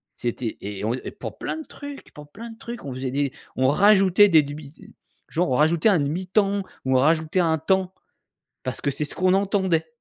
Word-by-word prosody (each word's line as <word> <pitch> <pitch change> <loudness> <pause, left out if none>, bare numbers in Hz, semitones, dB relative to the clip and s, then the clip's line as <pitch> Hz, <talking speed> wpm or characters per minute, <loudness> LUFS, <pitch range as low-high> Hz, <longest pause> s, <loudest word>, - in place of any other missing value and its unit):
C'était 120 -1 -4
et 100 0 -6
on, 115 - 0
heu 130 - -8 0.2
pour - - -7
plein - - -4
de 315 - -8
trucs, 285 -1 -10
pour 150 0 -13
plein 230 +6 -9
de 225 - -13
trucs. 235 +1 -8
On 140 - -5
faisait 130 0 -4
des 140 0 0 0.2
on 130 0 +2
rajoutait 195 +5 +5
des 160 -4 +6
dubi 145 0 -9
ze - - -17 0.5
genre 175 +2 0
on - - +2
rajoutait 160 - +3
un 190 -5 +3
demi 155 +6 -2
temps 200 +1 +1 0.2
ou 130 0 +3
on - - +4
rajoutait 160 +4 +2
un 160 -2 +2
temps. 190 +3 0 0.7
Parce 130 - -4
que 140 - 0
c'est 150 +3 -3
ce 145 - -8
qu'on 185 0 +3
entendait. 190 -4 +1
160 Hz, 220 wpm, -24 LUFS, 140-195 Hz, 0.7 s, des